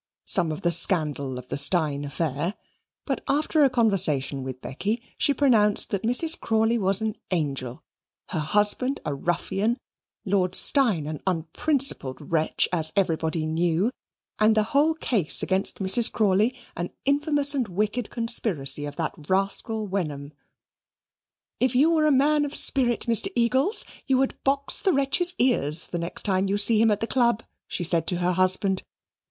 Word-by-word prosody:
some 175 -4 +4
of 155 - -6
the 170 - 0
scandal 145 -7 +1
of 125 0 -11
the - - -3
Steyne 145 -1 +1
affair; 150 +5 -3 0.5
but - - -3
after 300 +1 +1
a 275 - +4
conversation 170 - 0
with 130 -1 -7
Becky, 205 - -4 0.2
she - - +2
pronounced 230 -7 +2
that 200 - -2
Mrs. 315 +9 +3
Crawley 225 +1 0
was 195 +1 +5
an 220 -1 -3
angel, 140 -8 -3 0.5
her - - -3
husband 210 - +1
a 145 - -2
ruffian, 190 - -2 0.5
Lord 185 -2 0
Steyne 225 - +3
an 155 -1 -6
unprincipled 175 - -1
wretch, 160 -1 +1
as 160 -2 0
everybody 160 -4 -1
knew, 170 +6 0 0.5
and 215 +1 +3
the 215 - +2
whole 305 +3 +2
case 215 - -1
against 190 +1 -1
Mrs. 215 +5 +2
Crawley 215 +3 +1 0.2
an 175 +1 -4 0.2
infamous 290 0 +2
and 260 -5 -2
wicked 210 +5 -3
conspiracy 185 - +2
of 145 - -9
that 160 0 -3 0.2
rascal 200 +3 -2
Wenham. 150 -7 -5 1.3
"If 255 0 0
you 295 +6 +4
were 310 -2 +2
a - - +3
man 290 +2 +2
of 290 0 -4
any - - -1
spirit, 245 -4 +3
Mr. 235 - +1
Eagles, 260 - +1 0.2
you 265 -1 +2
would 265 0 0
box 275 +1 +1
the 380 - +1
wretch's 295 +6 +1
ears 165 - +1
the 175 - -4
next 170 +1 -2
time 195 -1 0
you 200 - 0
see 215 +1 +4
him 225 - +4
at 210 -1 -1
the - - 0
Club," 235 -2 0 0.2
she 175 - -4
said 170 -1 +1
to 180 - -1
her 180 +1 0
husband. 185 +1 0
200 Hz, 165 wpm, -24 LUFS, 165-250 Hz, 1.3 s, was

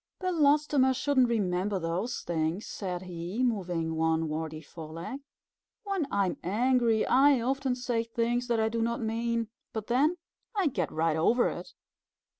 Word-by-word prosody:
"Belostoma 295 -6 +3
shouldn't 260 -2 +2
remember 195 -2 0
those 185 +8 -2
things," 165 +4 -1
said 180 -2 -4
he, 180 +6 -4
moving 180 -9 -1
one 160 0 +1
warty 155 0 -4
foreleg. 165 - -8 0.6
"When 390 -8 -1
I 200 -1 +2
am 180 - -2
angry, 230 +3 +2
I 275 +1 +5
often 265 +1 0
say 245 -2 -1
things 235 +1 -1
that 235 -2 +1
I 220 - +2
do 230 +1 -1
not 235 +1 0
mean; 230 0 -1 0.2
but 220 -2 -4
then, 285 +9 +2 0.4
I 385 -7 +2
get - - -2
right 160 0 +1
over 230 +10 +3
it. - - -8
230 Hz, 150 wpm, -29 LUFS, 175-255 Hz, 0.6 s, I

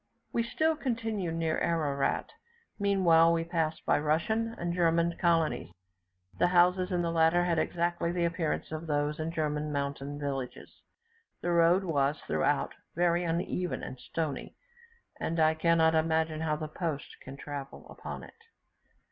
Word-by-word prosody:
We 235 - +2
still 315 +7 +1
continued 225 - -2
near 165 -1 0
Ararat; 145 -5 0 0.5
meanwhile 175 -5 +5
we 165 0 +1
passed 165 -2 -2
by - - +3
Russian 220 +10 0
and 175 0 -2
German 170 -1 +2
colonies, 165 - +1 0.7
the - - +5
houses 180 +1 +3
in 175 -1 +1
the 170 - 0
latter 165 +1 +4
had 170 -2 +1
exactly 175 0 0
the 175 -1 0
appearance 165 -2 -2
of 160 +1 -5
those 150 0 0
in 160 +1 -2
German 150 -2 -1
mountain 140 0 -3
villages. 135 -3 -5 0.6
The 175 - -1
road 170 +3 +4
was, 145 -4 +1
throughout, 75 -1 0 0.2
very 175 +1 +2
uneven 175 +1 -2
and 130 - -7
stony, 160 -4 -4 0.6
and 165 0 -2
I 155 0 +5
cannot 160 0 +3
imagine 160 0 +1
how 155 -1 0
the 155 0 -4
post 155 -2 -4
can 135 +1 -9
travel 140 -1 -7
upon - - -8
it. - - -12
165 Hz, 145 wpm, -30 LUFS, 155-175 Hz, 0.7 s, meanwhile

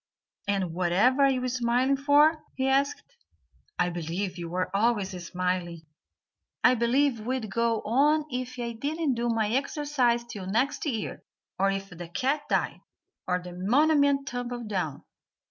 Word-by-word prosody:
"And 195 -4 0
whatever 185 +10 +2
are - - +5
you 255 -1 0
smiling 250 +2 +1
for?" 295 +3 +4
he 265 0 0
asked; 275 +2 +1 0.7
"I 175 - +1
believe 175 +3 -3
you 170 -1 -6
are 185 +1 -1
always 210 -2 +1
smiling. 180 -1 -2 0.8
I 250 - +7
believe 250 +2 +2
you'd 225 -1 -3
go 230 0 +1
on 295 +7 +3
if 255 0 -4
I 235 -1 -3
didn't 290 +4 -1
do 240 0 -1
my 220 -2 +1
exercise 265 -2 +1
till 205 -5 -8
next 235 +10 0
year, 225 -7 -3 0.4
or 195 +1 +3
if 195 0 -3
the 175 -1 -8
cat 270 - 0
died, - - 0 0.5
or 180 0 +2
the 180 0 -8
monument 280 - +3
tumbled 245 -2 -4
down." 180 -8 -3
235 Hz, 145 wpm, -27 LUFS, 190-270 Hz, 0.8 s, I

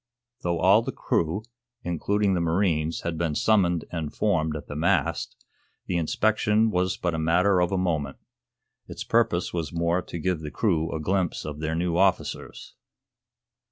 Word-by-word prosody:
Though 85 -1 0
all 95 +6 +5
the 125 +3 -4
crew, 85 -2 -1 0.4
including 100 +4 0
the 90 - 0
marines, 85 -2 0
had 85 -2 -3
been 80 -3 -1
summoned 90 -6 +2
and 80 -4 -3
formed 80 -7 0
at 75 - -6
the 75 - -8
mast, 80 +3 0 0.5
the 90 - -1
inspection 110 +5 +2
was 90 0 0
but 90 -1 -1
a 80 - -2
matter 90 +4 +3
of 90 - +1
a 95 - 0
moment. 80 -7 -1 0.7
Its - - -6
purpose - - +1
was 80 -4 -3
more 85 +1 0
to 85 - -7
give 90 0 -1
the 75 -1 -6
crew 80 -4 0
a 80 - -3
glimpse 90 +2 -1
of 75 -1 -6
their 80 +1 -2
new 85 0 0
officers. 95 -1 -1
85 Hz, 165 wpm, -26 LUFS, 80-95 Hz, 0.7 s, all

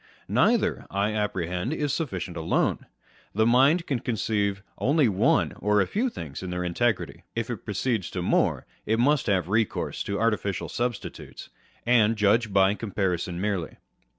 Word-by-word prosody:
Neither, - - +2
I 100 +2 0
apprehend, 95 - -2
is 145 -3 -1
sufficient 95 - -3
alone. 80 -1 0 0.5
The 110 +1 +3
mind 135 +9 +4
can 135 -4 -1
conceive 105 -4 -1 0.2
only 145 0 +3
one 95 -3 +2
or 105 0 +2
a 95 - +3
few 235 - 0
things 75 - -7
in 95 - -5
their 90 0 -2
integrity: 105 +5 -1
if - - -2
it - - -6
proceeds 115 -8 -1
to 90 - -4
more, - - +1 0.2
it 110 - +2
must 140 +4 +2
have 95 -5 +1
recourse 110 +2 -1
to 100 0 -2
artificial 105 -4 0
substitutes, 120 -2 -5 0.4
and 115 -2 +4
judge 110 +1 +2
by 95 0 +4
comparison 95 -5 -2
merely. 95 -5 -2
105 Hz, 150 wpm, -26 LUFS, 95-120 Hz, 0.5 s, mind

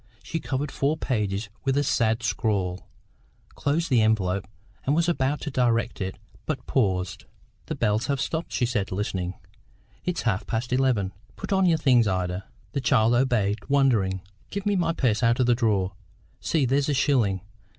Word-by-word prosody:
She 165 - -3
covered 140 -1 -3
four 145 +3 0
pages 105 -6 -1 0.2
with 135 0 +1
a 145 - +3
sad 115 -4 +1
scrawl, 100 -4 -1 0.6
closed 160 +4 -1
the 120 -3 +5
envelope, 100 -4 +1 0.4
and 140 - +1
was 170 +1 +2
about 145 -3 0
to 150 - -4
direct 120 -3 +1
it, 95 0 -3 0.3
but 135 -6 -3
paused. 95 -8 0 0.4
"The - - -3
bells 105 +3 +1
have 140 -2 0
stopped," 160 +4 -2
she 125 - +1
said, 115 -5 -1
listening. 95 -2 -2 0.7
"It's 180 -1 -2
half 105 -5 0
past 120 +2 -2
eleven. 125 -8 +1 0.2
Put - - -4
on 190 -1 +4
your 165 -2 +4
things, 125 -7 +4
Ida." 90 0 -1 0.3
The 140 - -2
child 120 -3 +3
obeyed, 120 -5 +2
wondering. 115 -10 +2 0.3
"Give 200 0 -4
me 205 -1 +2
my 170 -3 +2
purse 125 -9 +1
out 115 +1 +3
of 125 - +4
the 120 - +4
drawer. 105 -6 +1 0.5
See, 155 -5 +1
there's 135 +3 +1
a 145 - +2
shilling. 120 -9 +2
120 Hz, 170 wpm, -26 LUFS, 100-140 Hz, 0.7 s, the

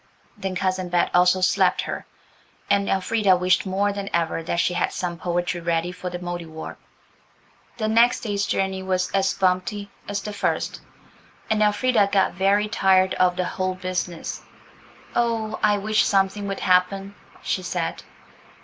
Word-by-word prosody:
Then 190 -1 -4
Cousin 185 -1 -1
Bet 175 0 +1
also 180 +1 +4
slapped 185 - +3
her. - - -5 0.6
And 200 0 +2
Elfrida 195 0 +2
wished 180 +2 +2
more 200 +2 0
than 200 0 -5
ever 165 -1 0
that 165 - -2
she 175 +1 +2
had 175 - 0
some 175 -1 -3
poetry 175 0 -2
ready 170 +1 0
for 180 0 -6
the 175 - -5
Mouldiwarp. 175 -3 -6 1.0
The 215 -2 -1
next 230 +2 +4
day's 205 -2 -1
journey 190 0 -1
was 185 -1 -1
as 195 -1 +2
bumpety. 190 +2 0 0.2
as 205 0 -2
the 210 - -5
first, - - -2 0.7
and 215 -1 +2
Elfrida 210 0 +3
got 195 -2 +2
very 200 +3 +2
tired 190 -3 +3
of 180 -1 +3
the 180 -1 -1
whole 185 0 -2
business. 185 -2 -4 0.7
"Oh, 225 -2 0
I 210 -1 +3
wish 215 +2 +2
something 195 +1 +1
would 195 -1 -4
happen!" 195 +2 +2 0.3
she 185 - -1
said. 180 -2 -3
190 Hz, 155 wpm, -23 LUFS, 180-205 Hz, 1.0 s, also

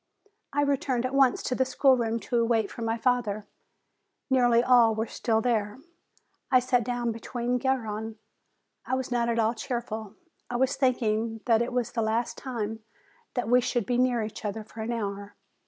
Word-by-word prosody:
I 290 - +1
returned 265 -3 0
at 255 - -3
once 270 -2 +3
to - - -1
the 260 - +2
schoolroom 250 -4 +2
to 240 -2 +1
wait 225 -4 +1
for - - -8
my 225 0 -1
father. 230 -4 0 0.9
Nearly 240 -2 +4
all 240 -3 +5
were 220 +1 -1
still 225 -1 0
there. 215 -3 0 0.7
I 255 -2 +6
sat 250 -1 +1
down 240 0 -1
be 225 - -7
side 245 +1 -2
Garrone. 225 -4 -2 0.7
I 260 - -1
was 260 -1 -3
not 235 -1 +1
at 230 - 0
all 225 0 +2
cheerful; 220 -3 -5 0.3
I 245 - -4
was 260 +2 +1
think 260 -2 +1
ing 225 +1 -1
that 230 -2 +4
it 235 - -1
was 245 -2 -1
the 235 - -1
last 225 +2 0
time 225 -4 -4 0.6
that 245 -3 -1
we 250 +2 +5
should 240 -3 -1
be 245 -1 0
near 250 -3 +2
each 215 +1 -7
other 215 +1 -3
for 220 +1 -10
an 225 +2 -3
hour. 205 -3 -4
235 Hz, 190 wpm, -27 LUFS, 220-250 Hz, 0.9 s, I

